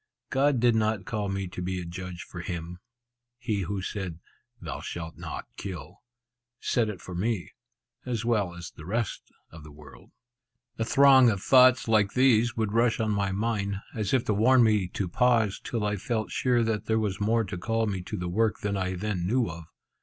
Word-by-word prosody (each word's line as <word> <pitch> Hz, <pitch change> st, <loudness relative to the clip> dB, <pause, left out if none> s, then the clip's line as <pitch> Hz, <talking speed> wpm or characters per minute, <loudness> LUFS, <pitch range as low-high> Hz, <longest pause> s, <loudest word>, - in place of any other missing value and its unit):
God 135 Hz, -1 st, +3 dB
did 120 Hz, 0 st, +4 dB
not 110 Hz, -2 st, 0 dB
call 105 Hz, -2 st, -2 dB
me 95 Hz, -1 st, -2 dB
to 90 Hz, -, -7 dB
be 90 Hz, +1 st, -2 dB
a 90 Hz, -, -6 dB
judge 90 Hz, 0 st, -7 dB
for 90 Hz, -, -9 dB
Him. 85 Hz, 0 st, -6 dB, 0.6 s
He 115 Hz, -5 st, -2 dB
who 95 Hz, +1 st, -3 dB
said, 95 Hz, -5 st, -4 dB, 0.4 s
'Thou -, -, -6 dB
shalt 80 Hz, -2 st, -6 dB
not -, -, -6 dB
kill,' 90 Hz, -1 st, -7 dB, 0.6 s
said 115 Hz, -3 st, +1 dB
it 100 Hz, -4 st, -6 dB
for 90 Hz, -, -9 dB
me, 100 Hz, +1 st, -2 dB, 0.5 s
as 120 Hz, -3 st, -3 dB
well 105 Hz, -7 st, 0 dB
as 85 Hz, -1 st, -8 dB
the 75 Hz, -, -12 dB
rest 115 Hz, +3 st, -3 dB, 0.2 s
of 80 Hz, -2 st, -12 dB
the 75 Hz, -, -12 dB
world." 75 Hz, -2 st, -15 dB, 0.7 s
A -, -, +2 dB
throng 130 Hz, +1 st, +6 dB
of 100 Hz, -3 st, 0 dB
thoughts 130 Hz, -1 st, +6 dB
like 105 Hz, -3 st, +3 dB
these 120 Hz, -3 st, +3 dB
would 110 Hz, -2 st, -1 dB
rush 115 Hz, 0 st, +2 dB
on 110 Hz, -1 st, 0 dB
my 100 Hz, -1 st, 0 dB
mind, 100 Hz, -1 st, -1 dB, 0.2 s
as 105 Hz, -3 st, -2 dB
if 130 Hz, -3 st, +2 dB
to 105 Hz, -, +1 dB
warn 120 Hz, +5 st, +5 dB
me 105 Hz, -4 st, +3 dB
to 90 Hz, +1 st, -3 dB
pause, 115 Hz, +1 st, +2 dB
till 115 Hz, -3 st, -2 dB
I 105 Hz, 0 st, 0 dB
felt 110 Hz, +1 st, -2 dB
sure 125 Hz, -2 st, +2 dB
that 110 Hz, -2 st, -1 dB
there 110 Hz, -, +2 dB
was 105 Hz, -2 st, -2 dB
more 115 Hz, +2 st, +2 dB
to 95 Hz, -2 st, -6 dB
call 115 Hz, +5 st, -1 dB
me 95 Hz, -4 st, -2 dB
to 105 Hz, +4 st, -6 dB
the 90 Hz, -1 st, -3 dB
work 110 Hz, +5 st, 0 dB
than 100 Hz, 0 st, -1 dB
I 95 Hz, -1 st, -1 dB
then 90 Hz, -2 st, -2 dB
knew 120 Hz, +2 st, +2 dB
of. 80 Hz, 0 st, -8 dB
105 Hz, 200 wpm, -27 LUFS, 90-115 Hz, 0.7 s, throng